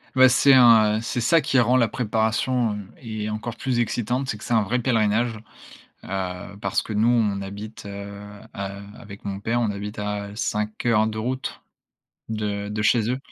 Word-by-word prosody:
Bah, 130 0 +7
c'est 135 +2 +5
un, 115 -4 +6
heu, - - -3
c'est 120 +1 -2
ça 165 +7 +4
qui 140 -1 0
rend 125 +1 +3
la 120 -3 +4
préparation, 110 +1 0
heu, - - -4 0.2
et 110 -3 -4
encore 110 +2 -4
plus 125 -2 -1
excitante. 120 +3 -1
C'est 105 - -2
que 105 - -12
c'est - - -2
un 110 - +4
vrai 110 +5 0
pèlerinage, 115 -1 +1 0.7
heu, 95 0 -5
parce 100 - 0
que - - -8
nous 110 +2 +2
on 110 -5 +2
habite, 105 +3 -8
heu - - -6 0.7
heu, 100 0 -5
avec 100 -1 -12
mon 100 -1 -4
père, 115 +4 0
on 110 -3 +1
habite 105 +1 -6
à 105 0 -4
5 105 +1 -3
heures 110 -2 +4
de 110 0 -4
route 130 +4 -3 0.7
de 105 -2 -3
de 105 0 -3
chez 115 +1 +3
eux, 130 - -1
110 Hz, 195 wpm, -24 LUFS, 105-120 Hz, 0.7 s, Bah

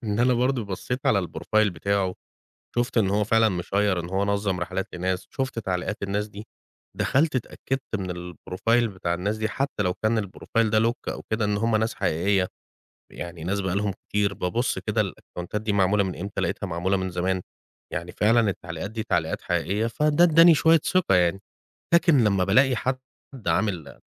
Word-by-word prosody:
إن 105 -1 -1
أنا 125 +1 +4
برضه 125 -1 +1
بصّيت 115 +7 -4
على 100 -3 +3
الProfile 110 -1 +1
بتاعه، 95 +2 0 0.6
شُفت 120 0 +1
إن 100 -4 +2
هو 105 +1 +2
فعلًا 110 +1 +4
مشيّر 95 0 0
إن 85 - -6
هو 95 +1 +1
نظّم 100 -2 0
رحلات 95 +2 -2
لناس، 90 +1 -2
شُفت 130 -3 -3
تعليقات 95 -1 -2
الناس 100 +2 -1
دي، 105 +2 -10 0.5
دخلت 145 0 +2
اتأكدت 130 0 -3
من 90 -2 -5
الProfile 115 +8 0
بتاع 90 -4 -2
الناس 100 +5 -2
دي، 110 0 -1
حتى 135 -2 -2
لو 90 -2 0
كان 110 +2 +1
الProfile 115 +4 -1
ده 110 +1 +3
lock 115 +1 -1
أو - - -8
كده، 110 0 +1
إن 105 0 +1
هُم 115 +1 +2
ناس 110 +2 0
حقيقية، 90 +3 +1 0.6
يعني 85 -2 -7
ناس 100 +3 -1
بقى 95 -1 -1
لهم 100 -1 0 0.2
كتير، 100 -1 +1
ببُص 115 +8 -1
كده - - -1
الأكونتات 90 +4 -4
دي 110 - -1
معمولة 100 0 +3
من 95 - -4
إمتى؟ 100 +3 -4
لقيتها 100 - -2
معمولة 90 +2 0
من 95 0 -2
زمان، 90 +1 -1 0.5
يعني 90 0 -4
فعلًا 115 +3 +3
التعليقات 85 +1 -6
دي 110 0 -4
تعليقات 90 -7 -1
حقيقية، 100 +6 0
فده 150 +7 +3
ادّاني 165 0 +7
شوية 160 +1 +5
ثقة 185 - +2
يعني. 90 +1 +3 0.5
لكن 165 -8 +5
لمّا 100 -3 +2
بالاقي 125 +7 +4
حد، 130 +2 -1 0.4
حد 125 -5 -6
عامل 90 -9 -1
100 Hz, 180 wpm, -25 LUFS, 90-115 Hz, 0.6 s, ادّاني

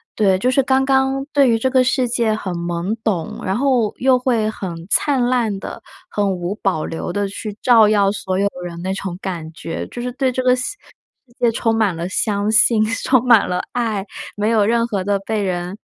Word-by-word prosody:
对， 195 -3 +3
就 250 +6 +1
是 270 +1 +3
刚 265 +1 +2
刚 265 0 +1
对 280 -3 +4
于 225 - +3
这 260 +3 0
个 260 -1 +4
世 255 -1 +1
界 230 -2 +1
很 190 -4 -4
懵 170 +3 -2
懂， 180 -7 -2
然 190 +3 0
后 250 -6 +1
又 255 0 +3
会 230 -4 +1
很 175 -5 -6
灿 270 0 +2
烂 235 -6 0
地， - - -7 0.3
很 205 -1 0
无 175 +1 -3
保 185 -7 -1
留 165 +1 -5
地 205 +1 0
去 210 +1 -7
照 230 -4 +6
耀 200 -2 +3
所 190 -2 -3
有 200 - +1 0.2
人 170 -1 -7
那 190 +1 -2
种 190 -2 -5
感 170 -4 -5
觉。 165 0 -6
就 240 - -7
是 250 0 -3
对 265 +1 0
这 255 0 -2
个 250 - +4
司 255 +11 -3 0.5
世 240 - -26
界 240 - +3
充 225 0 0
满 215 -6 +1
了， 170 +2 -4
相 205 +1 0
信， 220 0 +4 0.2
充 255 -2 +3
满 235 -4 +5
了 180 - -1
爱， 220 -5 -2 0.3
没 210 +2 0
有 220 -3 +3
任 230 +2 +2
何 200 -4 -3
的 200 -1 +1
被 215 +2 -2
人 180 0 -3
215 Hz, 230 characters per minute, -19 LUFS, 190-250 Hz, 0.5 s, 照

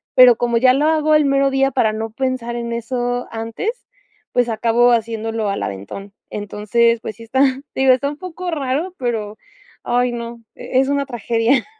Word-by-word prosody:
pero 250 -2 +8
como 235 -1 +1
ya 255 +2 +5
lo 285 +3 +1
hago 310 -1 +3
el 305 -1 +4
mero 275 0 +3
día 270 0 +2
para 225 -5 +2
no 220 +1 -4
pensar 255 -1 -2
en 235 0 -4
eso 245 +1 -2
antes, 230 - -4 0.5
pues 245 -1 +2
acabo 230 +2 +3
haciéndolo 225 -1 -1
al 200 - -2
aventón. 100 - -7 0.2
Entonces, 215 +3 0
pues 220 - -6
sí 230 - -11
está, 255 +4 0 0.3
te - - -2
digo, 265 -1 +6
está 280 +2 0
un 290 - -7
poco 360 +1 -6
raro, 295 +4 -2
pero 220 -4 -3 0.5
ay, 245 0 +1
no, 235 0 -6
e 255 - -1
es 265 - +2
una 280 0 0
tragedia. 235 0 +1
240 Hz, 185 wpm, -19 LUFS, 225-270 Hz, 0.5 s, pero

